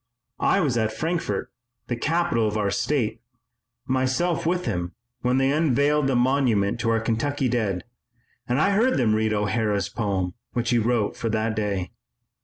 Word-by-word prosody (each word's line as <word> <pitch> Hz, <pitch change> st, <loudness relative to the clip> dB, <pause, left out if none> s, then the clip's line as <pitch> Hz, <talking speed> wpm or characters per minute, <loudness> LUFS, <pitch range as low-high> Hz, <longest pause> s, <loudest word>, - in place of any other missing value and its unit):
I 195 Hz, -, +3 dB
was 130 Hz, -8 st, +1 dB
at 110 Hz, 0 st, 0 dB
Frankfort, 155 Hz, -, -2 dB, 0.3 s
the 120 Hz, -, -2 dB
capital 135 Hz, -5 st, +1 dB
of 105 Hz, 0 st, -2 dB
our 100 Hz, -2 st, 0 dB
state, 120 Hz, +1 st, -1 dB, 0.6 s
myself 135 Hz, +7 st, 0 dB
with 180 Hz, +1 st, 0 dB
him, 90 Hz, -6 st, -2 dB, 0.3 s
when 125 Hz, +1 st, +1 dB
they 135 Hz, 0 st, +3 dB
unveiled 145 Hz, -1 st, +2 dB
the 135 Hz, -, +1 dB
monument 120 Hz, -5 st, +2 dB
to 115 Hz, -, 0 dB
our 115 Hz, 0 st, +2 dB
Kentucky 130 Hz, +5 st, -1 dB
dead 110 Hz, -7 st, -1 dB, 0.7 s
and 125 Hz, +3 st, +2 dB
I 195 Hz, +6 st, +3 dB
heard 230 Hz, +6 st, +3 dB
them 115 Hz, -5 st, +2 dB
read 110 Hz, 0 st, +1 dB
O'Hara's 105 Hz, -1 st, 0 dB
poem 95 Hz, -5 st, -2 dB, 0.2 s
which 120 Hz, 0 st, -1 dB
he 120 Hz, -, +4 dB
wrote 115 Hz, -2 st, 0 dB
for 115 Hz, -, -3 dB
that 110 Hz, 0 st, 0 dB
day. 100 Hz, -4 st, -2 dB
120 Hz, 165 wpm, -24 LUFS, 110-140 Hz, 0.7 s, he